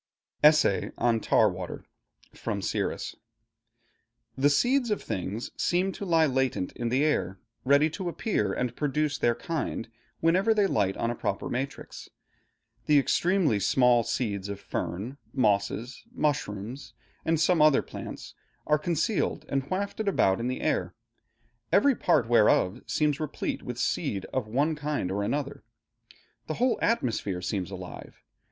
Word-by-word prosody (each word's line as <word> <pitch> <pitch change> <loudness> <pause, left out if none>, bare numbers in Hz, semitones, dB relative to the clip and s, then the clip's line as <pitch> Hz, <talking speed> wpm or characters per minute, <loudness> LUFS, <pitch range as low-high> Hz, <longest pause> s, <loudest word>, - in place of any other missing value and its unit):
ESSAY 150 -9 +5
ON 120 -2 +2
TAR 110 - +4
WATER 90 -2 -5 0.5
From - - -3
'Siris' - - -2 1.2
The 140 +2 +3
seeds 245 - +2
of 210 - -1
things 100 +5 -4
seem 185 +2 +1
to 200 - -6
lie 165 -3 +4
latent 130 -8 0
in 120 -1 -3
the 130 +4 +2
air, 95 -11 0 0.3
ready 140 +3 +5
to 175 +3 -4
appear 165 - -1
and 125 +3 -2
produce 150 0 -1
their 120 -1 +2
kind, 155 -7 -3 0.3
whenever 190 +7 +3
they 205 -2 +3
light 100 - +1
on 115 - 0
a - - -4
proper 100 - -3
matrix. 135 +3 -5 0.8
The 150 - +5
extremely 165 - +2
small 120 +3 +4
seeds 105 -4 -2
of 100 0 -5
fern, 105 +10 -4 0.2
mosses, 105 +2 0
mushrooms, 130 - -3 0.3
and 165 -1 +1
some 165 0 +3
other 150 -2 +5
plants, - - -8 0.3
are 150 0 +3
concealed 170 +2 -1
and 135 0 -1
wafted 200 +3 -2
about 95 - +3
in 120 - -2
the 130 - -3
air, - - -1 0.8
every 275 +8 +5
part 150 - +2
whereof 110 -5 +3
seems 150 -2 +1
replete 155 -2 -3
with - - -6
seeds 95 -2 -1
of 130 -5 -1
one 145 +8 +1
kind 150 -10 -2
or 100 +1 -1
other. 140 +4 -3 0.8
The 155 - -3
whole 250 0 +1
atmosphere 110 - 0
seems 90 0 -2
alive. 95 -2 -9
135 Hz, 145 wpm, -27 LUFS, 105-160 Hz, 1.2 s, ESSAY